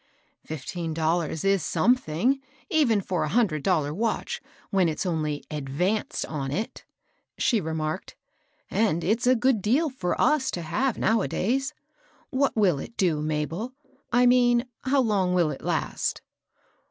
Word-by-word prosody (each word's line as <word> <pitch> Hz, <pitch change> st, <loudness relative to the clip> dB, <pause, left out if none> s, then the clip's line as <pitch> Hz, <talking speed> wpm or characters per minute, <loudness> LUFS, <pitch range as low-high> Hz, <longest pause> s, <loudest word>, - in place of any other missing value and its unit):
" -, -, -43 dB
Fifteen 160 Hz, +2 st, -4 dB
dollars 160 Hz, -1 st, 0 dB
is 195 Hz, -1 st, +3 dB
something, 245 Hz, -, +2 dB, 0.3 s
even 260 Hz, -, +3 dB
for 185 Hz, -1 st, -1 dB
a -, -, -1 dB
hundred 200 Hz, -10 st, +2 dB
dollar 150 Hz, -4 st, +1 dB
watch, 225 Hz, +7 st, -2 dB, 0.3 s
when 190 Hz, -4 st, +3 dB
it's 155 Hz, -, -3 dB
only 155 Hz, -4 st, -1 dB
advanced 150 Hz, +9 st, -1 dB
on 140 Hz, -4 st, -4 dB
it," 210 Hz, +10 st, -4 dB, 0.5 s
she 230 Hz, -5 st, +2 dB
remarked, 160 Hz, +1 st, -3 dB, 0.3 s
" -, -, -39 dB
and 195 Hz, -7 st, +1 dB
it's 225 Hz, +6 st, +1 dB
a 255 Hz, -, +6 dB
good 245 Hz, -2 st, +2 dB
deal 270 Hz, -, +2 dB
for 190 Hz, -9 st, -2 dB
us 300 Hz, -3 st, +3 dB
to 175 Hz, -, -3 dB
have 225 Hz, +11 st, 0 dB
now 225 Hz, 0 st, +2 dB
a -, -, -1 dB
days. 265 Hz, +7 st, -1 dB, 0.6 s
What 275 Hz, 0 st, +1 dB
will 190 Hz, -9 st, +3 dB
it 230 Hz, -, -9 dB
do, 170 Hz, -6 st, +2 dB
Mabel? 155 Hz, -, -2 dB, 0.2 s
— -, -, -37 dB
I 245 Hz, 0 st, +4 dB
mean 245 Hz, 0 st, +4 dB, 0.2 s
how 270 Hz, +1 st, +3 dB
long 195 Hz, -6 st, +1 dB
will 170 Hz, -4 st, +3 dB
it 135 Hz, -, -7 dB
last -, -, -1 dB
190 Hz, 160 wpm, -26 LUFS, 160-245 Hz, 0.6 s, a